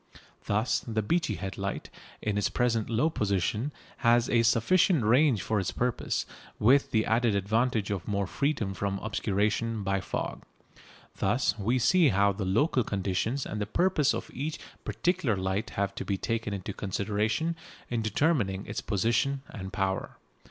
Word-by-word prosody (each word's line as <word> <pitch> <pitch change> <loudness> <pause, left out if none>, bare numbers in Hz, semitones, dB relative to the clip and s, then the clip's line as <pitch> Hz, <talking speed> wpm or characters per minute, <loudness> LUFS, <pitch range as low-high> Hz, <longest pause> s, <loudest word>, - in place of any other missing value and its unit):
Thus 105 +4 +1
the 110 -2 -2
Beachy 170 - 0
Head 95 -1 -6
light, 100 0 -4 0.3
in 105 -1 0
its 105 - +1
present 115 -3 0
low 120 +6 +2
position, 105 - 0 0.3
has 120 -1 +3
a 115 - +4
sufficient 135 - +3
range 125 - +4
for 110 -2 0
its 95 - -1
purpose, 125 -1 -1 0.3
with 135 +6 +4
the 110 -1 +1
added 115 -1 +2
advantage 110 +2 +1
of 95 -4 -3
more 100 -1 0
freedom 140 -6 -1
from 100 +1 -2
obscuration 110 +1 -1
by 95 0 0
fog. - - -4 0.8
Thus 120 +7 +1
we 115 +6 +1
see 165 +6 +4
how 100 -1 +3
the 100 0 -4
local 120 - +2
conditions 100 +7 -1
and 105 - -4
the 105 - -2
purpose 155 - +2
of - - -6
each 150 +4 -3 0.3
particular 170 - 0
light 95 +3 -1
have 100 0 0
to - - -5
be 100 - -1
taken 115 0 -2
into 100 0 -4
consideration 105 - -1 0.4
in 120 -2 0
determining 110 - +1
its 105 - -4
position 120 +6 0
and 95 -2 -7
power. 95 -1 -2
110 Hz, 160 wpm, -28 LUFS, 100-125 Hz, 0.8 s, a